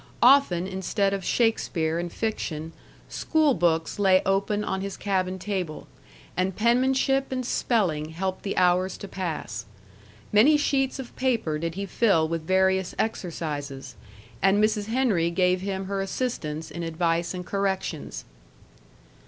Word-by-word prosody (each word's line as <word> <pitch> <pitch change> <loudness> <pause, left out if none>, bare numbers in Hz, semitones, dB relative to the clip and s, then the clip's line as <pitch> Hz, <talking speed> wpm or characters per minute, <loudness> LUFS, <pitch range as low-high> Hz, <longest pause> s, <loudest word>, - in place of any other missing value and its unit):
Often, 245 -9 +5
instead 190 +1 -1
of 195 -1 -3
Shakespeare 170 -8 +1
and 175 0 -4
fiction, 165 -8 -3 0.4
school 310 -3 +2
books 165 0 0
lay 190 -2 +4
open 200 +2 +1
on 190 - -2
his 195 0 -5
cabin 190 -2 -1
table; 185 -5 -4 0.5
and 185 0 0
penmanship 265 +4 +2
and 255 -1 -2
spelling 175 -12 0
helped 185 +3 -3
the 200 - -4
hours 180 +1 +2
to 200 - -8
pass. 160 - -4 0.7
Many 255 +9 +6
sheets 270 -3 +1
of 260 -3 -8
paper 230 -13 0
did 165 +1 -3
he 200 +1 -3
fill 195 -5 +2
with 165 -1 -4
various 190 0 +2
exercises, 150 -9 -3 0.5
and 195 +1 +4
Mrs. 210 0 +1
Henry 220 -9 +2
gave 180 +1 +2
him 190 0 -3
her 195 0 -2
assistance 165 -8 -3
in 170 +3 -5
advice 170 +1 -1
and 180 0 -6
corrections. 190 - -2
190 Hz, 135 wpm, -26 LUFS, 170-215 Hz, 0.7 s, Many